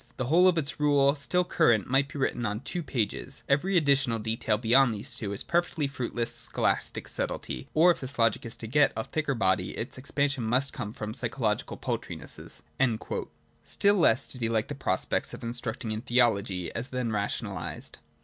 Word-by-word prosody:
The 130 Hz, -, -1 dB
whole 170 Hz, +8 st, +5 dB
of 180 Hz, -2 st, +3 dB
its 150 Hz, -2 st, -2 dB
rules, 145 Hz, -1 st, +3 dB
still 180 Hz, +5 st, +2 dB
current, 115 Hz, -, +2 dB
might 135 Hz, +2 st, +2 dB
be -, -, -7 dB
written 130 Hz, -3 st, -1 dB
on 105 Hz, 0 st, -2 dB
two 175 Hz, +6 st, -3 dB
pages: 130 Hz, -1 st, -3 dB
every 175 Hz, +8 st, +2 dB
additional 140 Hz, -6 st, +3 dB
detail 110 Hz, 0 st, 0 dB
beyond 120 Hz, +1 st, +4 dB
these 100 Hz, -, -3 dB
two 100 Hz, -3 st, -2 dB
is 100 Hz, -, -1 dB
perfectly 170 Hz, -3 st, 0 dB
fruitless 120 Hz, -3 st, -2 dB
scholastic -, -, -1 dB
subtlety; 65 Hz, -, -2 dB
— -, -, -36 dB
or 170 Hz, +3 st, +7 dB
if -, -, -2 dB
this 135 Hz, +2 st, -5 dB
logic 115 Hz, -2 st, +2 dB
is 115 Hz, -, -6 dB
to -, -, -7 dB
get 145 Hz, +4 st, +3 dB
a 110 Hz, -, -1 dB
thicker 150 Hz, 0 st, -2 dB
body, 95 Hz, -4 st, 0 dB
its 120 Hz, +3 st, -5 dB
expansion 140 Hz, -1 st, 0 dB
must 125 Hz, +5 st, +1 dB
come 105 Hz, -5 st, -5 dB
from 105 Hz, -1 st, -6 dB
psycho 120 Hz, +2 st, -2 dB
logical 105 Hz, -1 st, 0 dB
paltrinesses.' -, -, -6 dB, 1.0 s
Still 200 Hz, 0 st, +2 dB
less 140 Hz, -, +3 dB
did 125 Hz, -, -5 dB
he 115 Hz, -, +1 dB
like 115 Hz, +1 st, 0 dB
the -, -, -3 dB
prospect 140 Hz, -, -1 dB
of -, -, -12 dB
instructing 115 Hz, -1 st, -3 dB
in 110 Hz, 0 st, -3 dB
theology, 105 Hz, -8 st, +1 dB
as 115 Hz, +3 st, -3 dB
then 125 Hz, -3 st, -2 dB
rationalised. 100 Hz, -1 st, -4 dB
125 Hz, 190 wpm, -28 LUFS, 110-140 Hz, 1.0 s, or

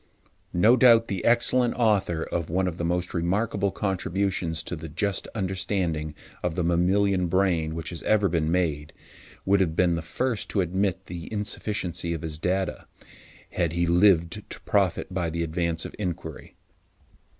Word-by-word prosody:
No 110 Hz, +8 st, +6 dB
doubt, 115 Hz, -3 st, +5 dB
the 95 Hz, -3 st, -3 dB
excellent 120 Hz, +1 st, +3 dB
author 100 Hz, -8 st, +1 dB
of 85 Hz, -2 st, -3 dB
one 95 Hz, +3 st, +1 dB
of 85 Hz, -1 st, -4 dB
the -, -, -2 dB
most 90 Hz, +1 st, -1 dB
remarkable 100 Hz, +4 st, 0 dB
contributions 95 Hz, -4 st, -1 dB
to 90 Hz, -, -4 dB
the 80 Hz, 0 st, -8 dB
just 95 Hz, +6 st, -1 dB
understanding 90 Hz, -6 st, -2 dB, 0.3 s
of 90 Hz, -2 st, -2 dB
the 90 Hz, -, 0 dB
mammalian 90 Hz, +2 st, +2 dB
brain 85 Hz, -3 st, +1 dB
which 80 Hz, +1 st, -5 dB
has 85 Hz, -, -6 dB
ever 105 Hz, -2 st, +3 dB
been 80 Hz, -2 st, 0 dB
made, 80 Hz, -5 st, -1 dB, 0.5 s
would 100 Hz, +1 st, +4 dB
have 85 Hz, -4 st, +1 dB
been 90 Hz, 0 st, +3 dB
the 85 Hz, -, -1 dB
first 115 Hz, +7 st, -2 dB
to 100 Hz, -, +1 dB
admit 95 Hz, +1 st, -1 dB
the 85 Hz, -1 st, -8 dB
insufficiency 100 Hz, -5 st, -2 dB
of 80 Hz, -, -7 dB
his 80 Hz, -1 st, -4 dB
data 95 Hz, +2 st, -1 dB, 0.6 s
had 85 Hz, -2 st, -1 dB
he 85 Hz, 0 st, +1 dB
lived 90 Hz, +2 st, +3 dB
to -, -, -6 dB
profit 95 Hz, -2 st, 0 dB
by 90 Hz, -3 st, -1 dB
the 85 Hz, +1 st, -2 dB
advance 85 Hz, 0 st, -2 dB
of -, -, -7 dB
inquiry. 85 Hz, -6 st, -5 dB
90 Hz, 160 wpm, -26 LUFS, 85-100 Hz, 0.6 s, No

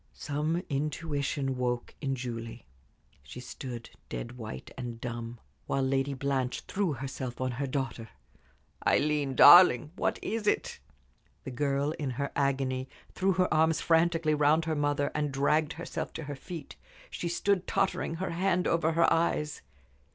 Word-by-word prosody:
Some 155 Hz, +4 st, -2 dB
intuition 140 Hz, -2 st, -2 dB
woke 125 Hz, -1 st, -2 dB
in 135 Hz, -2 st, -1 dB
Julie. 115 Hz, -2 st, -6 dB, 0.6 s
She 65 Hz, -, -10 dB
stood 125 Hz, -1 st, -7 dB, 0.2 s
dead 60 Hz, -, -5 dB
white 110 Hz, -, -8 dB
and 120 Hz, -2 st, -6 dB
dumb, 120 Hz, -1 st, -5 dB, 0.3 s
while 135 Hz, -, 0 dB
Lady 135 Hz, +1 st, 0 dB
Blanche 130 Hz, -1 st, -1 dB
threw 190 Hz, -6 st, -1 dB
herself 130 Hz, -1 st, -5 dB
on 130 Hz, 0 st, -1 dB
her 135 Hz, +3 st, -3 dB
daughter. 130 Hz, -4 st, -3 dB, 0.8 s
"Aileen, 145 Hz, -2 st, +2 dB
darling, 155 Hz, -5 st, +8 dB
what -, -, 0 dB
is 220 Hz, -1 st, -2 dB
it?" -, -, 0 dB, 0.6 s
The 130 Hz, -, -6 dB
girl, 140 Hz, +2 st, 0 dB
in 145 Hz, -3 st, -2 dB
her 140 Hz, 0 st, -2 dB
agony, 135 Hz, -2 st, 0 dB, 0.2 s
threw 190 Hz, 0 st, +1 dB
her 185 Hz, -1 st, +1 dB
arms 160 Hz, +1 st, +3 dB
frantically 165 Hz, -1 st, +2 dB
round 150 Hz, +2 st, +3 dB
her 160 Hz, -1 st, -1 dB
mother, 145 Hz, -1 st, 0 dB
and 150 Hz, -1 st, -1 dB
dragged 150 Hz, +3 st, +1 dB
herself 170 Hz, +1 st, -5 dB
to 160 Hz, -, -5 dB
her 145 Hz, 0 st, -5 dB
feet. 160 Hz, +1 st, -9 dB, 0.3 s
She 170 Hz, -, -3 dB
stood 190 Hz, +2 st, 0 dB
tottering, 190 Hz, -3 st, 0 dB
her 185 Hz, +3 st, -3 dB
hand 180 Hz, +1 st, +1 dB
over 165 Hz, -1 st, +2 dB
her 165 Hz, +1 st, +4 dB
eyes. 165 Hz, -2 st, 0 dB
140 Hz, 150 wpm, -29 LUFS, 130-160 Hz, 0.8 s, darling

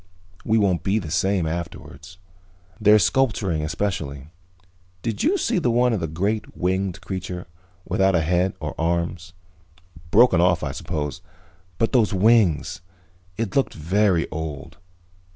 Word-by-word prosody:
We 110 Hz, -, +2 dB
won't 95 Hz, -5 st, +2 dB
be 95 Hz, +3 st, +1 dB
the 85 Hz, -8 st, -4 dB
same 95 Hz, +1 st, +1 dB
afterwards. 85 Hz, +1 st, -7 dB, 0.6 s
Their 105 Hz, 0 st, +6 dB
sculpturing, 105 Hz, -6 st, +1 dB
especially. 80 Hz, -3 st, -3 dB, 0.7 s
Did 115 Hz, -3 st, -2 dB
you 370 Hz, +6 st, +2 dB
see 195 Hz, -, 0 dB
the 150 Hz, -, 0 dB
one 120 Hz, +1 st, +3 dB
of 110 Hz, -, 0 dB
the 80 Hz, -, -2 dB
great 100 Hz, +8 st, -2 dB
winged 95 Hz, +1 st, -1 dB
creature, 90 Hz, -1 st, -5 dB, 0.4 s
without 95 Hz, -1 st, +2 dB
a 80 Hz, -, +3 dB
head 90 Hz, +4 st, +1 dB
or -, -, -4 dB
arms? 85 Hz, +1 st, -2 dB, 0.8 s
Broken 115 Hz, -3 st, +5 dB
off, 90 Hz, -2 st, +2 dB
I 70 Hz, -, -2 dB
suppose. 75 Hz, -2 st, -4 dB, 0.6 s
But 115 Hz, -, +1 dB
those 115 Hz, -5 st, +2 dB
wings 95 Hz, -4 st, +3 dB, 0.6 s
It 110 Hz, -4 st, -3 dB
looked 135 Hz, -, +1 dB
very 90 Hz, +2 st, +1 dB
old. 80 Hz, 0 st, -6 dB
90 Hz, 135 wpm, -23 LUFS, 80-105 Hz, 0.8 s, Their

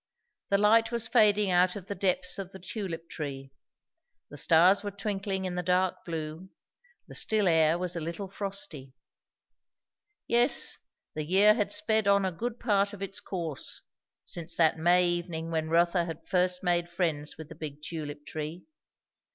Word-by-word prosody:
The 200 Hz, -, +4 dB
light 225 Hz, +3 st, +4 dB
was 235 Hz, -1 st, 0 dB
fading 210 Hz, -4 st, +4 dB
out 180 Hz, 0 st, +3 dB
of 200 Hz, -3 st, -7 dB
the 200 Hz, -, -4 dB
depths 200 Hz, +6 st, -1 dB
of 190 Hz, -1 st, -6 dB
the 190 Hz, -, -10 dB
tulip 180 Hz, -3 st, -5 dB
tree; 135 Hz, -3 st, -6 dB, 0.8 s
the -, -, -9 dB
stars 175 Hz, +7 st, +4 dB
were 205 Hz, -, -2 dB
twinkling 195 Hz, -1 st, -3 dB
in 185 Hz, -, -3 dB
the 180 Hz, -, -2 dB
dark 180 Hz, +1 st, +1 dB
blue; 160 Hz, +2 st, -5 dB, 0.6 s
the -, -, -11 dB
still 215 Hz, -3 st, +1 dB
air 160 Hz, -1 st, +4 dB
was 180 Hz, 0 st, -3 dB
a -, -, -2 dB
little 170 Hz, +5 st, -4 dB
frosty. 190 Hz, -9 st, -6 dB, 1.3 s
Yes, 240 Hz, +3 st, +2 dB, 0.3 s
the 155 Hz, -, -3 dB
year 195 Hz, +6 st, +6 dB
had 210 Hz, -2 st, -1 dB
sped 220 Hz, -10 st, +2 dB
on 200 Hz, -1 st, +4 dB
a 190 Hz, -, 0 dB
good 235 Hz, +7 st, -4 dB
part 200 Hz, -1 st, +1 dB
of 200 Hz, -1 st, -7 dB
its 195 Hz, 0 st, -4 dB
course, 165 Hz, -7 st, -5 dB, 0.4 s
since 165 Hz, -1 st, -4 dB
that 160 Hz, -1 st, +3 dB
May 175 Hz, +2 st, +4 dB
evening 170 Hz, -2 st, -3 dB
when 160 Hz, -1 st, -1 dB
Rotha 170 Hz, +1 st, +3 dB
had 165 Hz, -2 st, -8 dB
first 180 Hz, -1 st, +1 dB
made 175 Hz, -1 st, +1 dB
friends 160 Hz, -4 st, -2 dB
with 160 Hz, -1 st, -9 dB
the -, -, -8 dB
big 150 Hz, -2 st, -8 dB
tulip 150 Hz, -3 st, -6 dB
tree. 155 Hz, +3 st, -6 dB
180 Hz, 165 wpm, -29 LUFS, 165-200 Hz, 1.3 s, year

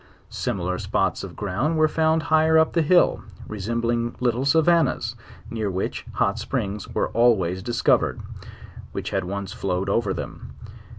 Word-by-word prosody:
Similar 90 Hz, -1 st, -2 dB
spots -, -, 0 dB
of -, -, -8 dB
ground 115 Hz, -, -1 dB
were 155 Hz, 0 st, +5 dB
found 160 Hz, +1 st, +1 dB
higher 160 Hz, 0 st, +4 dB
up 160 Hz, 0 st, +3 dB
the 170 Hz, -, +3 dB
hill, 175 Hz, +3 st, +4 dB, 0.3 s
resembling 115 Hz, +3 st, -2 dB
little 125 Hz, +1 st, 0 dB
savannas, 160 Hz, 0 st, +2 dB, 0.4 s
near 110 Hz, -3 st, -2 dB
which 95 Hz, 0 st, -3 dB
hot 100 Hz, +3 st, 0 dB
springs 105 Hz, -3 st, -3 dB
were -, -, 0 dB
always 95 Hz, -7 st, +2 dB
discovered, 120 Hz, +4 st, +1 dB, 0.7 s
which -, -, -4 dB
had -, -, -1 dB
once 100 Hz, +1 st, -4 dB
flowed 95 Hz, 0 st, -2 dB
over 105 Hz, 0 st, +1 dB
them. -, -, -7 dB
115 Hz, 140 wpm, -24 LUFS, 100-155 Hz, 0.7 s, were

